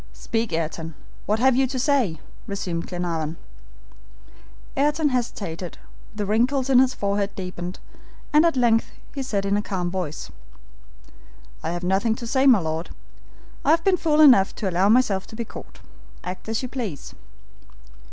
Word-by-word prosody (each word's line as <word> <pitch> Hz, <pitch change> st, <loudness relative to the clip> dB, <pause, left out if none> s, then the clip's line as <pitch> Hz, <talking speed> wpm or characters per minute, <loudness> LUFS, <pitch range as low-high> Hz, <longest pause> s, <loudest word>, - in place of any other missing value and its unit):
"Speak, 225 Hz, -2 st, -2 dB
Ayrton, 165 Hz, 0 st, -3 dB, 0.3 s
what 210 Hz, -, +2 dB
have 260 Hz, +2 st, +4 dB
you 265 Hz, +1 st, +3 dB
to 260 Hz, +1 st, -4 dB
say?" 250 Hz, -, +1 dB, 0.3 s
resumed 180 Hz, -4 st, -3 dB
Glenarvan. 165 Hz, -3 st, -3 dB, 1.4 s
Ayrton 295 Hz, +2 st, +2 dB
hesitated, 195 Hz, -9 st, -3 dB, 0.4 s
the 210 Hz, -1 st, -2 dB
wrinkles 250 Hz, +6 st, +1 dB
in 255 Hz, -, +7 dB
his 260 Hz, 0 st, +3 dB
forehead 200 Hz, 0 st, 0 dB
deepened, 180 Hz, -1 st, -5 dB, 0.6 s
and 300 Hz, +1 st, +6 dB
at 335 Hz, -5 st, +2 dB
length 230 Hz, -2 st, +3 dB, 0.2 s
he 275 Hz, -, -4 dB
said 210 Hz, -7 st, -2 dB
in 200 Hz, +1 st, +1 dB
calm 180 Hz, -4 st, -3 dB
voice: 175 Hz, -5 st, -4 dB, 1.3 s
"I -, -, -3 dB
have 175 Hz, +1 st, -4 dB
nothing 195 Hz, +5 st, +1 dB
to 235 Hz, -, -7 dB
say, 260 Hz, +4 st, +2 dB
my 250 Hz, -4 st, +8 dB
Lord. 160 Hz, -1 st, -3 dB, 0.7 s
I -, -, +1 dB
have 330 Hz, +1 st, +4 dB
been 385 Hz, -1 st, +4 dB
fool 310 Hz, -3 st, +2 dB
enough 250 Hz, -10 st, +7 dB
to 205 Hz, -, -3 dB
allow 185 Hz, +2 st, +2 dB
myself 215 Hz, -5 st, +3 dB
to -, -, -10 dB
be 235 Hz, +1 st, -4 dB
caught. -, -, -11 dB, 0.4 s
Act 185 Hz, +4 st, -6 dB
as 225 Hz, +3 st, -1 dB
you -, -, -2 dB
please." 230 Hz, -, -5 dB
210 Hz, 155 wpm, -24 LUFS, 180-260 Hz, 1.4 s, my